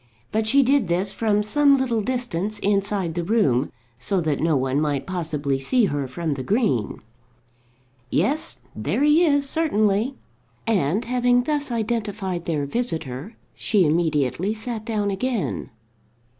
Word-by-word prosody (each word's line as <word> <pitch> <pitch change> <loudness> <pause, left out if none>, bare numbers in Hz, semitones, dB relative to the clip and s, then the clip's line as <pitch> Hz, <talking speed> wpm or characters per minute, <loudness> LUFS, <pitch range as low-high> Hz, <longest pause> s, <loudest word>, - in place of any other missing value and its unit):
But 220 0 0
she 275 +5 +6
did 265 -4 +2
this 185 +3 0
from 210 -2 +1
some 280 +6 +4
little 240 -4 0
distance 215 -4 -2
inside 200 -3 0
the 175 +1 -2
room, 155 - +2 0.3
so 190 +10 +1
that 155 -4 -1
no 160 -2 +2
one 135 +2 0
might 145 -3 -1
possibly 155 -7 -2
see 230 - +2
her 145 -6 -2
from 160 +5 -3
the 135 - -5
green. 140 - 0 1.1
"Yes; 205 - 0 0.2
there 200 - -1
he 300 +3 +5
is, 285 -4 +3
certainly," 230 -6 +1 0.5
and, 200 - +1
having 245 0 +2
thus 290 -1 -1
identified 210 -6 -2
their 150 -4 -1
visitor, 160 - -3 0.2
she 200 -5 +2
immediately 155 - +1
sat 220 -1 -5
down 210 -3 -1
again. 230 - -2
205 Hz, 140 wpm, -23 LUFS, 160-240 Hz, 1.1 s, she